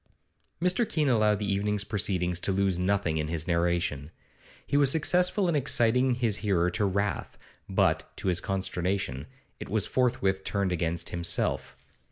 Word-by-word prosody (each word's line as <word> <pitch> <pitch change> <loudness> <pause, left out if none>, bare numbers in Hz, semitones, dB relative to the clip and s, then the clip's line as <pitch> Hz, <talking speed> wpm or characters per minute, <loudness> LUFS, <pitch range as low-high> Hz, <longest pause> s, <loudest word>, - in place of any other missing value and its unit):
Mr. 180 +6 +1
Keene 155 -9 +1
allowed 110 -3 +3
the 100 -1 -1
evening's 105 +1 -1
proceedings 90 -4 -1
to 95 - -1
lose 95 -2 +1
nothing 90 -4 0
in 75 - -2
his 80 +1 -3
narration. 85 -4 0 0.6
He 140 - -2
was 145 -2 +5
successful 180 +6 +2
in 170 - +1
exciting 125 -2 +2
his 115 -4 0
hearer 90 -5 +1
to 100 +4 0
wrath, 100 +1 -2 0.3
but, - - +1
to - - -4
his 90 -1 +2
consternation, 95 -7 -2 0.3
it - - -8
was 105 -2 +1
forthwith 115 -7 0
turned 100 -2 -1
against 85 -1 -1
himself. 85 0 -1
100 Hz, 155 wpm, -28 LUFS, 90-120 Hz, 0.6 s, was